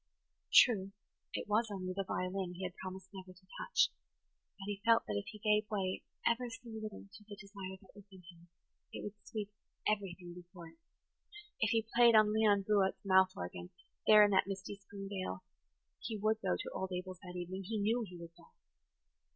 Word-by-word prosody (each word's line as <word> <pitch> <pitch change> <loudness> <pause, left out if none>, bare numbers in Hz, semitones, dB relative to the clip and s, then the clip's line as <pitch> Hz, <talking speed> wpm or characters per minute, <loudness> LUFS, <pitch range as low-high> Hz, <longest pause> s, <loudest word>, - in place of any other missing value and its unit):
True, 195 -5 +6 0.4
it - - -3
was 215 +2 +2
only 185 -2 -4
the 195 - -1
violin 185 -1 -3
he 185 - -6
had 180 0 -4
promised 190 0 -8
never 185 -1 -9
to 185 +1 -23
touch; 480 - +3 0.7
but 195 - -8
he 200 -1 -4
felt 230 -1 +5
that 105 - -3
if 100 - -3
he 215 - -8
gave 210 0 +2
way 190 -3 -1 0.2
ever 240 +1 +2
so 245 0 -10
little 215 -2 -7
to 210 - -13
the 205 - -7
desire 195 -2 -8
that 190 - -20
was 205 -1 -14
in 190 -1 -14
him, 170 0 -19 0.4
it - - -6
would 205 - -5
sweep 210 -1 -5 0.4
everything 190 -4 -2
before 175 -1 -11
it. 320 - -22 0.8
If 215 - +2
he 225 0 +2
played 235 -1 +7
on 215 -1 +6
Leon 210 -2 +4
Buote's 200 -2 +2
mouth 190 -1 +5
organ, 90 0 -6 0.4
there 210 -1 +9
in 205 - +1
that 190 -1 +4
misty 195 0 -5
spring 195 0 -9
dale, 185 - -4 0.6
he 225 -2 -4
would 215 +1 +1
go 190 - +1
to - - -5
old 190 0 -3
Abel's 180 0 -5
that 180 -2 -10
evening; 180 +2 -5
he 220 +3 -2
knew 225 +4 +1
he 180 - -10
would 170 -1 -10
go. - - -18
195 Hz, 195 wpm, -35 LUFS, 185-215 Hz, 0.8 s, there